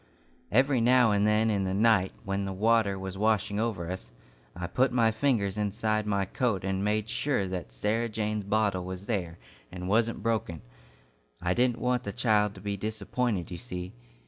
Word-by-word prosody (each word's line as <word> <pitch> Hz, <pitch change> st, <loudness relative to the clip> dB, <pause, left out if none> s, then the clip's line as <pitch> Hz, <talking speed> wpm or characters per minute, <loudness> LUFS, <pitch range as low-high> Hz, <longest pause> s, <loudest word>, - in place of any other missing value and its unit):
"Every 130 Hz, +2 st, +3 dB
now 125 Hz, -1 st, +5 dB
and 105 Hz, 0 st, +2 dB
then 110 Hz, +1 st, +3 dB
in 100 Hz, -2 st, 0 dB
the 95 Hz, 0 st, -1 dB
night, 105 Hz, -3 st, +3 dB
when 100 Hz, 0 st, -2 dB
the 95 Hz, -, -3 dB
water 110 Hz, 0 st, +2 dB
was 95 Hz, 0 st, -6 dB
washing 105 Hz, -1 st, +1 dB
over 110 Hz, -7 st, -2 dB
us, 75 Hz, -10 st, -7 dB, 0.4 s
I 90 Hz, 0 st, -4 dB
put 130 Hz, +9 st, +1 dB
my 115 Hz, -2 st, +3 dB
fingers 110 Hz, -5 st, 0 dB
inside 105 Hz, +1 st, 0 dB
my 100 Hz, -2 st, +1 dB
coat 105 Hz, -2 st, -1 dB
and 95 Hz, 0 st, -1 dB
made 105 Hz, +1 st, 0 dB
sure 110 Hz, -1 st, 0 dB
that 90 Hz, -9 st, -5 dB
Sarah 110 Hz, -, -1 dB
Jane's 105 Hz, -1 st, -2 dB
bottle 100 Hz, -3 st, +1 dB
was 95 Hz, +1 st, -7 dB
there, 90 Hz, -7 st, -2 dB, 0.3 s
and 90 Hz, 0 st, -6 dB
wasn't 110 Hz, +1 st, +1 dB
broken. 110 Hz, -8 st, -1 dB, 0.8 s
I 90 Hz, +1 st, 0 dB
didn't 120 Hz, +1 st, +2 dB
want 125 Hz, -1 st, 0 dB
the 100 Hz, -, -5 dB
child 105 Hz, -2 st, +2 dB
to 95 Hz, -, -11 dB
be 100 Hz, 0 st, -3 dB
disappointed, 110 Hz, -1 st, -2 dB
you 85 Hz, -, -5 dB
see. 90 Hz, -6 st, -6 dB
105 Hz, 180 wpm, -28 LUFS, 95-115 Hz, 0.8 s, now